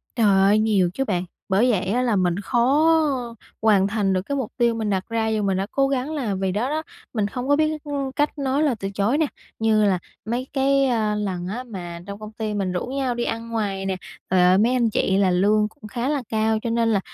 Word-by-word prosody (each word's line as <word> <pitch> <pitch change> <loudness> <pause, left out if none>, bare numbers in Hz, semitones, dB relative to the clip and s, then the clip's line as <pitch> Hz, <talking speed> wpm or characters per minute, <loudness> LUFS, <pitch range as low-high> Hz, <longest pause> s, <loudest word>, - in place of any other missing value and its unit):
Trời 230 -2 +2
ơi, 195 +1 +4
nhiều 205 -5 +2
chứ 270 - -1
bạn! 185 -5 -1 0.2
Bởi 220 +6 +3
vậy 190 -4 0
á 220 +7 +1
là 240 -4 +1
mình 180 -1 +1
khó 250 +8 +2 0.8
hoàn 205 -3 +4
thành 200 -2 0
được 185 - +1
cái 280 +9 -4
mục 260 -6 -3
tiêu 235 -2 +2
mình 220 -2 -2
đặt 190 -2 0
ra 225 -1 0
dù 220 -1 0
mình 195 -1 +1
đã 195 +1 -2
cố 275 0 +2
gắng 275 +2 -2
là 245 -10 -2
vì 190 0 -1
đó 220 +7 -1
đó, 310 +2 -2 0.3
mình 215 -4 0
không 250 +5 -5
có 285 - +4
biết, 310 0 0
ưm, 280 -2 -3
cách 295 +3 -1
nói 275 +1 0
lời 285 -5 +2
từ 195 - -3
chối 200 +7 0
nè. 315 - +3 0.3
Như 220 -1 +3
là 190 -3 +2 0.3
mấy 240 +4 -2
cái, 275 0 +3
à, 220 -5 +1
lần 190 -4 -3
á 230 +7 -4
mà 175 -8 -7
trong 200 0 -7
công 215 0 -8
ty 215 -1 -4
mình 195 -3 -1
rủ 180 - -2
nhau 260 -1 -2
đi 240 - -1
ăn 230 0 -3
ngoài 200 -4 -2
nè, 190 -1 -1 0.3
ờ, 180 0 +4
mấy 235 +4 +3
anh 240 -3 +2
chị 190 -2 +1
là 195 -2 +3
lương 210 +4 +3
cũng 220 -1 -13
khá 240 +4 -2
là 290 -2 0
cao 220 0 +1
cho 235 - -3
nên 230 0 +1
là, 205 - +3
220 Hz, 250 wpm, -23 LUFS, 195-255 Hz, 0.8 s, ơi